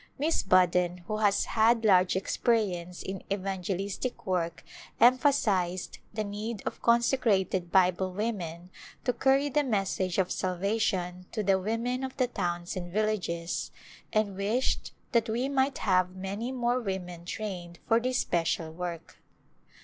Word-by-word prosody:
Miss 315 Hz, +4 st, +1 dB
Budden 180 Hz, -1 st, +3 dB
who 215 Hz, -, -1 dB
has 205 Hz, -2 st, +2 dB
had 225 Hz, +1 st, +3 dB
large 185 Hz, -3 st, +5 dB
experience 190 Hz, -4 st, 0 dB
in. 190 Hz, -1 st, -5 dB
evangelistic 195 Hz, +4 st, -3 dB
work 170 Hz, -3 st, -1 dB, 0.4 s
emphasized 230 Hz, -9 st, +3 dB
the 215 Hz, 0 st, -2 dB
need 210 Hz, +2 st, -5 dB
of -, -, -4 dB
consecrated 225 Hz, -7 st, +2 dB
Bible 185 Hz, 0 st, +3 dB
women 180 Hz, -4 st, -4 dB, 0.3 s
to 250 Hz, -, +1 dB
carry 270 Hz, +3 st, +3 dB
the 290 Hz, +1 st, +1 dB
message 195 Hz, -6 st, 0 dB
of 185 Hz, -2 st, +1 dB
salvation 185 Hz, -1 st, -1 dB
to 215 Hz, -, -1 dB
the 195 Hz, -1 st, +3 dB
women 230 Hz, +6 st, -1 dB
of 260 Hz, 0 st, -5 dB
the 255 Hz, -, +3 dB
towns 175 Hz, -7 st, -3 dB
and 175 Hz, -1 st, -5 dB
villages, 185 Hz, -5 st, -1 dB, 0.4 s
and 215 Hz, -3 st, +1 dB
wished 215 Hz, +7 st, 0 dB, 0.2 s
that 235 Hz, -2 st, +2 dB
we 240 Hz, +4 st, 0 dB
might 270 Hz, 0 st, +1 dB
have 185 Hz, -2 st, +2 dB
many 200 Hz, +6 st, -4 dB
more 245 Hz, -1 st, +1 dB
women 180 Hz, -5 st, -4 dB
trained 175 Hz, -3 st, -5 dB
for 225 Hz, -, +4 dB
this 250 Hz, +1 st, 0 dB
special 165 Hz, -4 st, 0 dB
work. 170 Hz, 0 st, -6 dB
195 Hz, 135 wpm, -29 LUFS, 180-235 Hz, 0.4 s, large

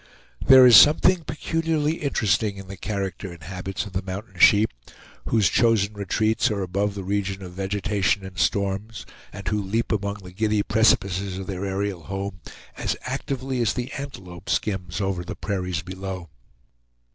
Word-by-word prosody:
There 130 Hz, -1 st, +8 dB
is 120 Hz, -2 st, +9 dB
something 165 Hz, +3 st, +6 dB
peculiarly 160 Hz, 0 st, -1 dB
interesting 105 Hz, -, 0 dB
in 95 Hz, -1 st, -9 dB
the 100 Hz, -, -7 dB
character 95 Hz, -1 st, -4 dB
and 85 Hz, -4 st, -12 dB
habits 95 Hz, +3 st, -5 dB
of 100 Hz, -, -10 dB
the 95 Hz, -, -1 dB
mountain 95 Hz, -1 st, -7 dB
sheep, 105 Hz, +4 st, +6 dB, 0.5 s
whose 110 Hz, -4 st, +3 dB
chosen 110 Hz, -3 st, +2 dB
retreats 110 Hz, +2 st, +1 dB
are 100 Hz, -3 st, -2 dB
above 100 Hz, +2 st, -1 dB
the 100 Hz, -, -5 dB
region 100 Hz, 0 st, -2 dB
of 90 Hz, -, -8 dB
vegetation 100 Hz, +1 st, -1 dB
and 95 Hz, -1 st, -9 dB
storms, 100 Hz, +6 st, -1 dB, 0.3 s
and 100 Hz, -1 st, -9 dB
who 105 Hz, +1 st, 0 dB
leap 105 Hz, +4 st, -2 dB
among 100 Hz, -1 st, -1 dB
the 90 Hz, -, -10 dB
giddy 105 Hz, +2 st, 0 dB
precipices 100 Hz, -4 st, +2 dB
of 95 Hz, -, -5 dB
their 95 Hz, 0 st, -4 dB
aerial 95 Hz, -2 st, -2 dB
home 95 Hz, 0 st, -5 dB, 0.4 s
as -, -, -2 dB
actively 130 Hz, -1 st, -3 dB
as 110 Hz, -3 st, +1 dB
the 125 Hz, 0 st, -4 dB
antelope 95 Hz, -11 st, -8 dB
skims 95 Hz, -2 st, -1 dB
over 95 Hz, -2 st, -1 dB
the -, -, -6 dB
prairies 95 Hz, -3 st, -3 dB
below. 95 Hz, -1 st, -6 dB
100 Hz, 160 wpm, -24 LUFS, 95-110 Hz, 0.5 s, is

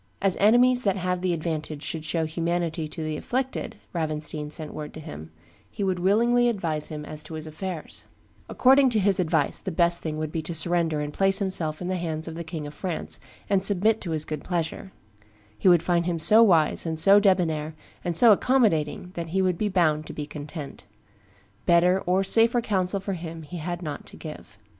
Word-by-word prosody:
"As 195 Hz, -2 st, +1 dB
enemies 245 Hz, +4 st, +5 dB
that 195 Hz, -4 st, 0 dB
have 180 Hz, -1 st, -2 dB
the 185 Hz, -1 st, 0 dB
advantage 155 Hz, -2 st, -4 dB
should 160 Hz, -2 st, -4 dB
show 160 Hz, +1 st, -1 dB
humanity 165 Hz, 0 st, -2 dB
to 160 Hz, +1 st, -6 dB
the 155 Hz, -1 st, -3 dB
afflicted," 260 Hz, -, -3 dB, 0.2 s
Ravenstein 155 Hz, -2 st, -3 dB
sent 155 Hz, 0 st, -6 dB
word 150 Hz, -1 st, -7 dB
to -, -, -7 dB
him, 80 Hz, -, -9 dB, 0.4 s
"he 205 Hz, -, -5 dB
would 185 Hz, -2 st, 0 dB
willingly 235 Hz, +6 st, +3 dB
advise 165 Hz, -9 st, -2 dB
him 150 Hz, -1 st, -7 dB
as 155 Hz, 0 st, -7 dB
to 160 Hz, +1 st, -6 dB
his 155 Hz, 0 st, -6 dB
affairs; 160 Hz, +1 st, -6 dB, 0.4 s
according 265 Hz, +1 st, +5 dB
to 225 Hz, -3 st, +1 dB
his 195 Hz, -1 st, +3 dB
advice, 160 Hz, -4 st, +1 dB
the 190 Hz, -, -4 dB
best 170 Hz, 0 st, +3 dB
thing 155 Hz, -1 st, -4 dB
would 155 Hz, -1 st, -3 dB
be 160 Hz, -, -2 dB
to 165 Hz, +2 st, -4 dB
surrender 165 Hz, -2 st, +2 dB
and 145 Hz, 0 st, -5 dB
place 195 Hz, 0 st, +3 dB
himself 180 Hz, -5 st, -1 dB
in -, -, -4 dB
the 185 Hz, 0 st, -1 dB
hands 160 Hz, -2 st, -2 dB
of 165 Hz, -, -5 dB
the 170 Hz, +1 st, -6 dB
King 160 Hz, -2 st, -6 dB
of 145 Hz, -, -8 dB
France, 180 Hz, -2 st, -4 dB, 0.3 s
and 195 Hz, -2 st, +1 dB
submit 205 Hz, +3 st, +2 dB
to 180 Hz, -, -5 dB
his 155 Hz, -2 st, -2 dB
good 155 Hz, -2 st, -5 dB
pleasure; 175 Hz, +3 st, -3 dB, 0.6 s
he 145 Hz, -, -1 dB
would 175 Hz, -2 st, +6 dB
find 170 Hz, -1 st, +1 dB
him 175 Hz, -1 st, -1 dB
so 210 Hz, +8 st, +6 dB
wise, 170 Hz, -9 st, +4 dB
and 160 Hz, -1 st, -3 dB
so 200 Hz, +4 st, +7 dB
debonnair, 160 Hz, -6 st, +1 dB, 0.3 s
and 175 Hz, -2 st, -2 dB
so 235 Hz, +2 st, +7 dB
accommodating, 190 Hz, -, +1 dB
that 170 Hz, -2 st, -5 dB
he 190 Hz, +4 st, 0 dB
would 185 Hz, -1 st, +1 dB
be 210 Hz, +4 st, -1 dB
bound 155 Hz, -5 st, +1 dB
to -, -, -7 dB
be 150 Hz, -, -5 dB
content. 145 Hz, -1 st, -8 dB, 0.8 s
Better 180 Hz, +2 st, +4 dB
or 185 Hz, +2 st, +2 dB
safer 230 Hz, +4 st, +3 dB
counsel 195 Hz, -4 st, 0 dB
for 195 Hz, +1 st, -4 dB
him 165 Hz, -2 st, -7 dB
he 175 Hz, +4 st, -8 dB
had 175 Hz, +2 st, -5 dB
not 150 Hz, -3 st, -6 dB
to -, -, -13 dB
give." -, -, -10 dB
170 Hz, 205 wpm, -25 LUFS, 155-195 Hz, 0.8 s, so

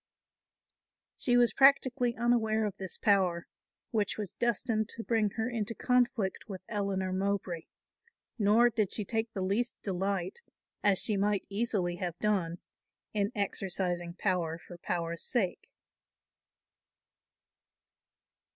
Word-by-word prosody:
She 245 Hz, -1 st, +2 dB
was 240 Hz, -1 st, +4 dB
practically 260 Hz, -3 st, +4 dB
unaware 225 Hz, -2 st, +2 dB
of 205 Hz, -, -3 dB
this 190 Hz, -2 st, -6 dB
power, 185 Hz, -4 st, +2 dB, 0.5 s
which 210 Hz, -3 st, 0 dB
was 210 Hz, -4 st, -4 dB
destined 230 Hz, -2 st, 0 dB
to 230 Hz, -, -5 dB
bring 225 Hz, -3 st, +2 dB
her 225 Hz, +2 st, 0 dB
into 230 Hz, -2 st, -2 dB
conflict 245 Hz, -5 st, +1 dB
with 190 Hz, -2 st, -7 dB
Eleanor 195 Hz, -3 st, -1 dB
Mowbray; 190 Hz, -3 st, -2 dB, 0.7 s
nor 225 Hz, +4 st, +5 dB
did 215 Hz, -4 st, 0 dB
she 210 Hz, -, -2 dB
take 225 Hz, +2 st, -1 dB
the 190 Hz, -, -2 dB
least 220 Hz, +6 st, 0 dB
delight, 195 Hz, -, -2 dB, 0.4 s
as 200 Hz, -2 st, +4 dB
she 210 Hz, +1 st, +1 dB
might 205 Hz, 0 st, +1 dB
easily 200 Hz, -4 st, 0 dB
have 175 Hz, -2 st, -4 dB
done, 185 Hz, -4 st, 0 dB, 0.6 s
in 205 Hz, 0 st, 0 dB
exercising 180 Hz, -4 st, -2 dB
power 170 Hz, -4 st, 0 dB
for 175 Hz, 0 st, -12 dB
power's 170 Hz, -1 st, -2 dB
sake. 215 Hz, -8 st, -1 dB
205 Hz, 120 wpm, -31 LUFS, 185-225 Hz, 0.7 s, nor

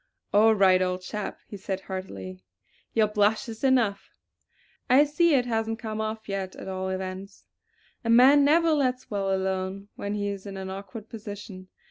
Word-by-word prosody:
"All 220 Hz, +2 st, +6 dB
right, 190 Hz, -2 st, +5 dB
old 185 Hz, 0 st, -1 dB
chap!" 210 Hz, +2 st, -5 dB
he 205 Hz, -, -8 dB
said 190 Hz, 0 st, -4 dB
heartily. 95 Hz, -, -7 dB, 0.5 s
"Your 220 Hz, -2 st, +4 dB
blush 210 Hz, +4 st, +1 dB
is 225 Hz, +1 st, -8 dB
enough. 245 Hz, -7 st, +2 dB, 0.8 s
I 265 Hz, +3 st, +7 dB
see 300 Hz, +2 st, +3 dB
it 250 Hz, -2 st, +2 dB
hasn't 225 Hz, -1 st, -1 dB
come 220 Hz, -2 st, -4 dB
off 220 Hz, 0 st, -4 dB
yet 195 Hz, -2 st, -4 dB
at -, -, -9 dB
all 190 Hz, 0 st, -3 dB
events!" 190 Hz, +1 st, -6 dB, 0.6 s
A 230 Hz, -, -3 dB
man 260 Hz, +5 st, +7 dB
never 325 Hz, +3 st, +4 dB
lets 255 Hz, -6 st, 0 dB
well 195 Hz, -1 st, -1 dB
alone 190 Hz, +1 st, -2 dB
when 200 Hz, +1 st, -3 dB
he 205 Hz, -1 st, -2 dB
is 200 Hz, 0 st, -6 dB
in 195 Hz, -1 st, -7 dB
an 190 Hz, 0 st, -5 dB
awkward 200 Hz, +3 st, -8 dB
position. 205 Hz, -4 st, -9 dB
205 Hz, 170 wpm, -26 LUFS, 190-225 Hz, 0.8 s, I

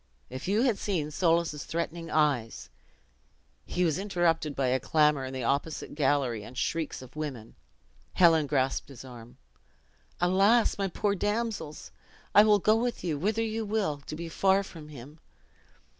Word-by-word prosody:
If 130 Hz, +5 st, -6 dB
you 210 Hz, +5 st, +2 dB
had 240 Hz, -6 st, +1 dB
seen 160 Hz, -7 st, -2 dB
Soulis' 165 Hz, -2 st, +1 dB
threatening 170 Hz, 0 st, -4 dB
eyes 145 Hz, -7 st, 0 dB, 0.5 s
" -, -, -40 dB
He 180 Hz, -, +2 dB
was 160 Hz, 0 st, 0 dB
interrupted 170 Hz, -6 st, 0 dB
by 135 Hz, -2 st, 0 dB
a 130 Hz, +1 st, +2 dB
clamor 150 Hz, -1 st, +2 dB
in 130 Hz, -, -6 dB
the 130 Hz, -1 st, -4 dB
opposite 140 Hz, +5 st, -2 dB
gallery, 135 Hz, -6 st, 0 dB
and 120 Hz, -, -11 dB
the -, -, -3 dB
shrieks 160 Hz, -3 st, -2 dB
of 130 Hz, -, -15 dB
women. 135 Hz, -8 st, -6 dB, 0.6 s
Helen 165 Hz, -4 st, +5 dB
grasped 135 Hz, -1 st, 0 dB
his 135 Hz, -1 st, -11 dB
arm. 120 Hz, -2 st, -12 dB, 0.8 s
"Alas, 195 Hz, +6 st, +3 dB
my 195 Hz, -, +1 dB
poor 200 Hz, +3 st, -1 dB
damsels! 205 Hz, -6 st, -3 dB, 0.4 s
I 205 Hz, -, +8 dB
will 210 Hz, -1 st, +5 dB
go 215 Hz, +2 st, +3 dB
with 235 Hz, -2 st, -2 dB
you, 160 Hz, -5 st, -2 dB
whither 215 Hz, +6 st, 0 dB
you 225 Hz, 0 st, -2 dB
will, 205 Hz, -9 st, -1 dB
to -, -, -5 dB
be 170 Hz, +1 st, -6 dB
far 190 Hz, +4 st, +2 dB
from 160 Hz, -5 st, -11 dB
him." 145 Hz, +2 st, -12 dB
160 Hz, 165 wpm, -28 LUFS, 140-195 Hz, 0.8 s, I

